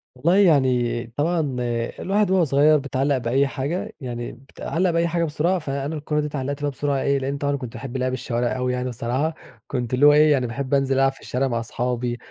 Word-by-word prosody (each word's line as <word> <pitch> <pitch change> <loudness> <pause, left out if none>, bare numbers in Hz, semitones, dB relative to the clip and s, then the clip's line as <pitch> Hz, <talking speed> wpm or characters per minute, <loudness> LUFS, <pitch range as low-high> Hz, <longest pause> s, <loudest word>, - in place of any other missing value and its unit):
والله 170 +9 +2
يعني 130 -10 +3
طبعًا 150 -4 0 0.4
الواحد 200 0 +1
وهو 185 -2 +4
صغير 150 +2 +4
بيتعلَّق 140 0 0
بأي 130 +3 +1
حاجة، 145 +6 -3
يعني 120 -2 -5
بيتعلَّق 165 +7 -3
بأي 170 0 +1
حاجة 170 0 0
بسرعة، 165 +4 0
فأنا 140 +1 -3
الكورة 150 0 -2
دي 150 - -1
اتعلَّقت 140 0 -4
بيها 145 - 0
بسرعة 140 0 -1
إيه، 140 0 +2
لإن 140 +1 -2
طبعًا 145 0 0
كنت 125 -4 -6
باحب 135 -1 -6
لعب 130 0 -1
الشوارع 120 0 -1
أوي 125 0 -1
يعني 125 0 -2
الصراحة، 130 +7 -2 0.3
كنت 125 -2 -3
اللي 135 +3 +4
هو 145 - +8
إيه 150 0 +5
يعني 130 -4 +2
باحب 130 +4 -4
أنزل 135 -1 +2
ألعب 135 0 +3
في - - -17
الشارع 135 +2 -1
مع 115 -2 -1
أصحابي، 120 +1 -2
135 Hz, 205 wpm, -23 LUFS, 125-150 Hz, 0.4 s, هو